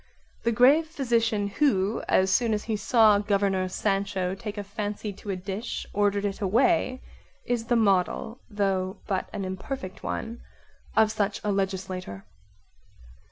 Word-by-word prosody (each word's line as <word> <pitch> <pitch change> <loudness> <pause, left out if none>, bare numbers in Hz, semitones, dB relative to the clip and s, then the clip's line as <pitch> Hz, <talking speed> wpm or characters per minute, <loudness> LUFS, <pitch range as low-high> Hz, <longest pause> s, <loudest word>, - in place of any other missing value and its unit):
The 235 - +1
grave 270 +8 +5
physician 230 -8 0
who, 205 -3 +1
as 190 0 +3
soon 230 -3 +2
as 210 - -4
he 220 - -2
saw 215 0 +4
Governor 200 -2 +1
Sancho 195 -1 -1
take 205 +2 -6
a 205 - -3
fancy 205 +1 -4
to 200 +1 -11
a 195 - 0
dish, 195 +5 -5
ordered 205 0 +1
it 200 +1 -3
away 255 - +2 0.4
is 240 -2 -1
the 240 - +1
model, 215 +2 +1
though 195 -3 -1
but 190 -2 -2
an 195 - -4
imperfect 190 +2 -6
one, 230 +1 -4 0.6
of 220 -1 +5
such 205 -1 -1
a 210 - 0
legislator. 190 - -3
205 Hz, 145 wpm, -26 LUFS, 195-225 Hz, 0.6 s, grave